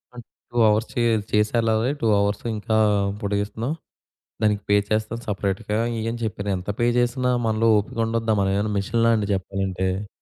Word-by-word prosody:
అ - - -13 0.3
2 120 - -5
hours 110 +2 +1
చే 120 - 0 0.3
చేసెళ్ళాలి. 110 +2 +2
2 115 - +1
hours 100 0 0
ఇంకా 110 +1 -2 0.5
పొడిగిస్తున్నాం. 105 +6 -2 0.7
దానికి 105 -1 +2
పే 100 - +5
చేస్తాం 110 +1 -1
సెపరేట్‌గా 100 +1 -2 0.2
ఇయ్యని 115 +1 -3
చెప్పారు. 100 -1 -4
ఎంత 90 - -7
పే 120 - +3
చేసినా 125 +1 +1
మనలో 110 +1 +1
ఓపిక 105 +2 -3
ఉండొద్దా? 115 -1 0
మనమేవైనా 100 +2 0
మిషన్‌లా 115 +3 +2
అండి? 105 -1 -1
చెప్పాలంటే. 95 +1 -2
105 Hz, 145 wpm, -23 LUFS, 100-115 Hz, 0.7 s, పే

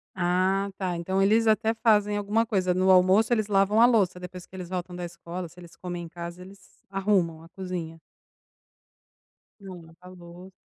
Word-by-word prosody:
Ah, 185 +2 +1
tá. 185 -3 -2
Então, 190 +3 -1
eles 220 +3 +3
até 220 +1 +2
fazem 210 -2 +2
alguma 210 +3 0
coisa 185 -5 0
no 185 +1 +1
almoço. 190 +5 +5
Eles 215 -3 0
lavam 200 +1 +2
a - - +9
louça, 200 -7 +2
depois 180 0 -9
que 190 - -16
eles 180 -2 -7
voltam 180 -1 -5
da 175 0 -5
escola, 170 +1 -7
se 175 +2 -17
eles 170 -1 -14
comem 175 -1 -6
em 165 - -9
casa, 170 +1 -8
eles 195 +1 -16
arrumam 190 -5 0
a 165 - -15
cozinha. 175 -3 -6 1.6
É, 200 - -15 0.4
lavou 180 +1 -13
185 Hz, 175 wpm, -26 LUFS, 175-205 Hz, 1.6 s, a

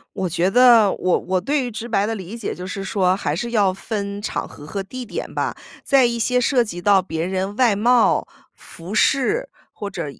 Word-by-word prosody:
我 185 - -1
觉 175 +3 +1
得 235 -3 +6
我 185 - +1
我 185 0 -1
对 280 +7 0
于 - - -4
直 230 +1 -6
白 205 -3 +1
的 225 +1 -2
理 195 +4 -8
解 225 - -4
就 180 - -7
是 195 +1 -5
说， 190 -2 +1
还 150 -6 -2
是 235 +7 -4
要 205 -5 +3
分 200 0 -4
场 - - -3
合 145 - -13
和 195 +5 -4
地 250 +6 -7
点 - - -6
吧， - - -1 0.3
在 270 -2 +4
一 235 0 0
些 250 +2 +1
涉 250 0 +3
及 175 -6 -7
到 200 -1 +4
别 160 -3 -4
人 190 +2 -3
外 240 -5 +3
貌、 235 +3 +3 0.3
服 175 +6 -9
饰、 420 - +2 0.3
或 205 -2 -6
者， 170 -4 -4
205 Hz, 230 characters per minute, -21 LUFS, 185-240 Hz, 0.3 s, 得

